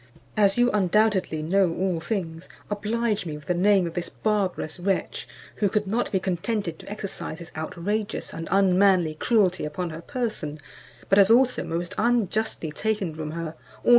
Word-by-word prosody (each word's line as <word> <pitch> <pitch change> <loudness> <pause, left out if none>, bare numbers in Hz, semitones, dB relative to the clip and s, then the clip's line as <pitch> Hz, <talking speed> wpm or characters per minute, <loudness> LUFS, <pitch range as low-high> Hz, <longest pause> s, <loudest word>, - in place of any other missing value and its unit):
As 200 -1 +3
you 245 0 +4
undoubtedly 195 -4 +2
know 180 +1 +2
all 185 -3 0
things, 170 -3 -4 0.2
oblige 215 -1 -1
me 150 -2 -4
with 150 - -14
the 180 - +1
name 190 +1 +4
of 165 - -4
this 175 -1 -3
barbarous 195 -6 -1
wretch, 190 +1 -1 0.3
who 205 - +2
could 210 +2 0
not 225 +5 -1
be 190 - +2
contented 185 -1 -2
to - - -11
exercise 200 -5 -5
his 170 0 -11
outrageous 200 +7 -3
and 165 - -5
unmanly 190 -3 +4
cruelty 190 +1 +2
upon 165 +3 -3
her 160 +1 -7
person, 190 - -3 0.5
but 195 - +5
has 195 0 +6
also 250 +2 +4
most 170 +1 -3
unjustly 220 -7 0
taken 205 -1 -1
from 155 -1 -5
her 165 0 -3
all 160 - -3
her 125 -2 -24
substance. - - -11
190 Hz, 175 wpm, -25 LUFS, 165-210 Hz, 0.5 s, has